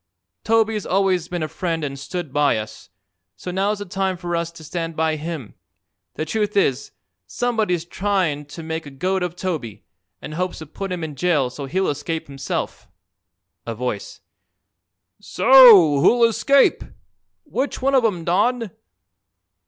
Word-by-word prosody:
Toby's 220 -2 +1
always 185 -3 +1
been 175 -2 -3
a - - -2
friend 165 -2 -3
an' 140 -1 -3
stood 140 +2 -6
by 145 -5 +3
us, 110 -1 -8 0.5
so 180 - -7
now's 200 +3 0
the 205 - -6
time 190 0 -2
for 175 -1 -3
us 170 0 -2
to 165 - -12
stand 165 +1 -4
by 160 0 +1
him. 155 - -6 0.6
The 155 - -3
truth 210 +4 -1
is, 140 -8 +1 0.4
somebody's 220 - -1
tryin' 180 -6 -1
to 145 +3 -10
make 160 -1 -5
a - - -7
goat 185 +8 -2
of 175 -1 -3
Toby, 150 - -5 0.3
and 155 - -8
hopes 180 +3 -3
to 160 - -8
put 195 +6 -6
him 180 -2 -3
in 155 -2 -5
jail 140 -4 +1
so 140 +2 -7
he'll 190 +6 0
escape 160 +3 -3
himself." 135 -2 -5 0.8
A 115 - -3
Voice: 120 -3 -5 1.0
"So 195 - +7
who'll 235 +8 +4
escape? 275 +5 +3 0.6
Which 275 - -3
one 275 +1 +1
of 260 -2 +4
'em, 180 -7 0
Don?" 215 +5 +1
175 Hz, 155 wpm, -21 LUFS, 150-195 Hz, 1.0 s, So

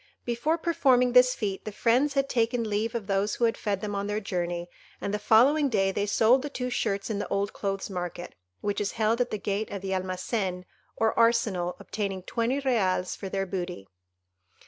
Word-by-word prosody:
Before 240 +7 0
performing 260 -7 +3
this 250 0 +6
feat 200 -3 -3
the 215 - -5
friends 250 +7 +2
had 275 0 +2
taken 235 -2 0
leave 215 +2 -1
of 225 -4 -3
those 195 +1 0
who - - -3
had 225 - +1
fed 200 -3 -2
them 210 -1 -3
on 200 0 -2
their 210 +1 -1
journey, 175 -3 -3 0.3
and 200 - -3
the 210 - 0
following 265 +8 +4
day 195 -4 +2
they 205 +1 -1
sold 230 +5 +4
the 290 - -4
two 250 -3 -4
shirts 200 -3 -1
in 205 - -2
the - - -3
old 200 +1 -1
clothes' 195 -1 -3
market, 180 -2 -5 0.3
which 205 0 -1
is 205 - -2
held 225 +2 +1
at 245 - 0
the 215 - -2
gate 205 +1 -2
of 200 -1 -6
the 190 - -3
Almacen 185 0 -2 0.3
or 225 0 +2
arsenal, 220 -7 +2
obtaining 195 -3 -4
twenty 235 +7 -1
reals 195 -9 +1
for 195 - -6
their 195 0 -1
booty. 180 - -5
210 Hz, 200 wpm, -27 LUFS, 195-240 Hz, 0.3 s, this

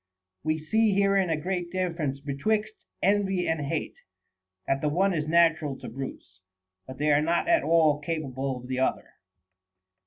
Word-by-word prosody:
We 155 +1 0
see 215 +8 +2
then 195 - +1
herein 195 -2 +2
a 160 - +1
great 175 +1 -3
difference 165 -7 -2
betwixt 210 +10 -1 0.3
envy 195 -2 +2
and 160 -2 0
hate, 140 - -3 0.7
that 135 0 0
the 150 - +1
one 190 +5 +2
is 155 -2 -2
natural 160 -4 +3
to - - -8
brutes, 115 -7 -8 0.5
but 130 - -9
they 150 +1 +1
are 145 - +4
not 170 - +1
at 335 -1 +4
all 160 -3 +3
capable 140 -4 -3
of 125 0 -10
the 130 0 -2
other. 130 - -1
160 Hz, 165 wpm, -27 LUFS, 140-185 Hz, 0.7 s, are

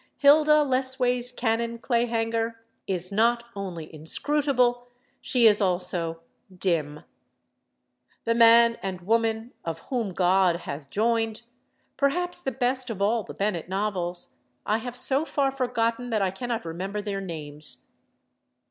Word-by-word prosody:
Hilda 300 +1 +6
Lessways 255 -2 0
Cannon 235 -1 -1
Clayhanger 230 -1 0 0.3
is 180 -1 -1
not 235 +3 +2
only 175 -6 -6
inscrutable; 245 - 0 0.3
she 245 -2 +2
is 210 -1 +6
also 180 -3 -1 0.3
dim. 165 -5 -1 1.2
The 230 - +2
man 230 0 +6
and 190 -2 -4
woman 225 +3 0
of 165 -1 -5
"Whom 235 -6 -1
God 180 -1 +3
Hath 140 -2 -7
Joined," 225 +2 0 0.5
perhaps 355 +6 +2
the 270 - -1
best 255 0 0
of 220 -4 -5
all 220 +3 +2
the - - -10
Bennett 195 -5 -2
novels, 190 -3 -2 0.3
I 215 +2 +1
have 245 +1 -7
so 265 +3 +2
far 280 -4 0
forgotten 245 -2 -1
that 215 -3 +1
I 190 - 0
cannot 230 +1 -4
remember 190 +5 -4
their 200 -1 -3
names. 150 -4 -3
225 Hz, 130 wpm, -26 LUFS, 185-245 Hz, 1.2 s, Hilda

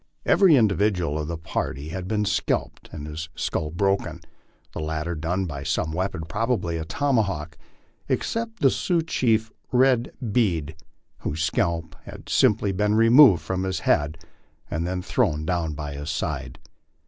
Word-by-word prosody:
Every 190 -6 +6
individual 100 - +2
of 75 - -3
the 85 0 -3
party 75 -2 -4
had 90 +2 -5
been 105 +1 0
scalped - - -1
and 75 -2 -7
his 80 +1 -6
skull 75 - -2
broken 95 +4 0 0.5
the - - -5
lat 80 0 -2
ter 85 +1 -3
done 85 +4 -1
by 70 -5 -5
some 80 +2 -1
weapon, 90 0 -2
probably 105 -5 -1
a 80 - -4
tomahawk 95 - 0 0.5
except 230 0 -2
the - - +5
Sioux 170 -3 0
chief 115 -8 +1 0.2
Red 125 -1 +3 0.2
Bead, 85 -9 +1 0.4
whose 80 +2 -3
scalp 85 -1 -1
had - - -11
simply 105 -1 +3
been 105 +2 +1
removed 115 - +7
from 95 +3 -2
his 95 -4 -2
head 75 +2 +1 0.5
and 85 0 -1
then 90 0 -3
thrown 80 -12 0
down 85 -3 -1
by 75 -1 -5
his 75 +2 -6
side. 80 - -3
90 Hz, 155 wpm, -24 LUFS, 80-110 Hz, 0.5 s, removed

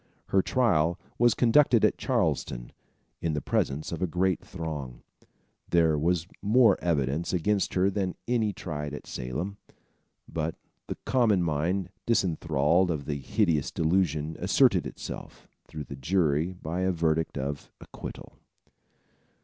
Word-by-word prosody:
Her 95 - +4
trial 90 - +2 0.2
was 120 0 +5
conducted 120 -1 +5
at - - +1
Charlestown - - -1 0.5
in 80 -2 0
the 75 - 0
presence 70 +2 -1
of 85 - -4
a 90 - +2
great 90 +2 0
throng. 75 -8 -6 0.7
There 80 -2 +4
was 85 +2 +1 0.2
more 115 +4 +5
evidence 80 0 0
against 100 +3 +1
her 95 +1 +3
than 95 -2 -2
any 115 -3 +1
tried 75 -5 -5
at - - -9
Salem; 80 +12 -4 0.7
but 80 0 -3 0.3
the - - -4
common 110 -8 +3
mind 85 +4 -1 0.2
disenthralled 85 -4 +2
of 75 -4 -2
the 70 -1 -3
hideous 80 - +1
delusion 80 -2 0
asserted - - +3
itself, - - -8 0.2
through 75 - -6
the 70 - -8
jury 80 +2 +1
by 85 0 -5
a 95 0 +2
verdict 80 -2 0
of 70 +1 -4
acquittal. - - -10
85 Hz, 135 wpm, -28 LUFS, 75-95 Hz, 0.7 s, was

